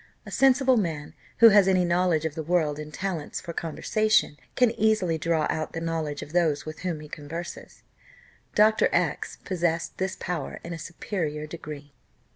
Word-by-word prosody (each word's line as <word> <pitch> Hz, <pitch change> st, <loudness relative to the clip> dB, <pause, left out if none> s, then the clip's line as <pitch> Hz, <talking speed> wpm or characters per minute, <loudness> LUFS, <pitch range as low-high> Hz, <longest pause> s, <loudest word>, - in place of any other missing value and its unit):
A -, -, -9 dB
sensible 265 Hz, -1 st, +4 dB
man, 160 Hz, -7 st, -2 dB, 0.3 s
who 230 Hz, -, +11 dB
has 200 Hz, -2 st, +6 dB
any 185 Hz, -2 st, +3 dB
knowledge 175 Hz, -2 st, +2 dB
of 160 Hz, -, -2 dB
the 160 Hz, -, -4 dB
world 155 Hz, -2 st, 0 dB
and 150 Hz, 0 st, -7 dB
talents 175 Hz, -3 st, -4 dB
for 170 Hz, -2 st, -7 dB
conversation, 215 Hz, +3 st, +1 dB, 0.2 s
can 250 Hz, -2 st, +4 dB
easily 215 Hz, -7 st, +1 dB
draw 160 Hz, 0 st, +1 dB
out 155 Hz, 0 st, -2 dB
the 165 Hz, -, -3 dB
knowledge 160 Hz, -3 st, -3 dB
of 150 Hz, -, -12 dB
those 165 Hz, -5 st, +2 dB
with 155 Hz, 0 st, -7 dB
whom 175 Hz, -4 st, -3 dB
he 150 Hz, -, -9 dB
converses. 160 Hz, +4 st, -8 dB, 0.7 s
Dr. 215 Hz, +1 st, +5 dB
X -, -, -1 dB
possessed 170 Hz, -3 st, -1 dB
this 190 Hz, 0 st, -1 dB
power 170 Hz, -6 st, -4 dB
in 170 Hz, -, -6 dB
a 165 Hz, -, -6 dB
superior 160 Hz, -3 st, -4 dB
degree. 150 Hz, -2 st, -9 dB
170 Hz, 170 wpm, -26 LUFS, 155-190 Hz, 0.7 s, who